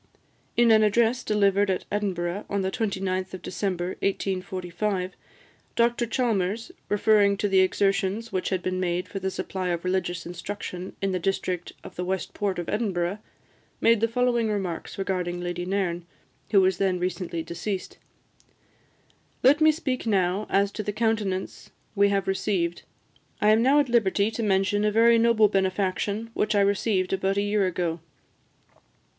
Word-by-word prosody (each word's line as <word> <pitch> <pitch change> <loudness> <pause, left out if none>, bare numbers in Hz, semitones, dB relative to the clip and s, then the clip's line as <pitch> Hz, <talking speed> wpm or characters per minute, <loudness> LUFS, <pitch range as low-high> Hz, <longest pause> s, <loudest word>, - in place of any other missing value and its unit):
In 235 -1 +5
an 220 -1 +6
address 230 +4 +2
delivered 200 -1 +2
at 185 - -1
Edinburgh, 195 -2 -2
on 200 -1 -1
the 190 - -1
29th 190 -4 -2
of 185 - -11
December 185 -2 -2
1845, 185 0 -2 0.6
Dr 235 0 +2
Chalmers, 225 - -1 0.2
referring 205 -1 +3
to 205 - 0
the 195 -1 +3
exertions 195 +3 +1
which 185 - -1
had 185 -2 -2
been 185 0 -1
made 180 0 -1
for 195 - -5
the 190 0 -2
supply 185 0 -4
of 170 0 -2
religious 180 -2 -1
instruction 180 +1 -6
in 195 - +1
the 185 - -1
district 180 -1 -2
of - - -11
the 180 - -2
West 190 +1 -3
Port 200 -2 -2
of 175 - -4
Edinburgh, 195 -3 -1 0.6
made 230 -2 +4
the 230 - +3
following 240 -1 +1
remarks 190 -5 -3
regarding 180 -2 -2
Lady 175 0 -3
Nairn, 180 -3 -1 0.4
who 200 -3 +5
was 185 -1 +2
then 190 -2 +1
recently 180 -2 -3
deceased: 185 +4 -5 1.4
"Let 285 +4 +5
me 310 0 +7
speak 265 -7 -3
now 195 0 +1
as 200 0 +2
to 215 - -4
the 210 0 -3
countenance 215 -4 -2 0.2
we 200 -1 +4
have 195 -1 0
received. 190 -3 -1 0.6
I 210 - +3
am 220 +1 +5
now 270 +4 +5
at 290 - +2
liberty 210 -3 +2
to 225 - -4
mention 205 0 +1
a 210 - +2
very 230 +2 +5
noble 225 -2 +5
benefaction 195 +3 -1
which 215 -1 0
I 200 - +4
received 200 -1 +1
about 195 +1 0
a 200 - +2
year 205 -1 +1
ago. 170 -2 -2
195 Hz, 160 wpm, -26 LUFS, 185-215 Hz, 1.4 s, me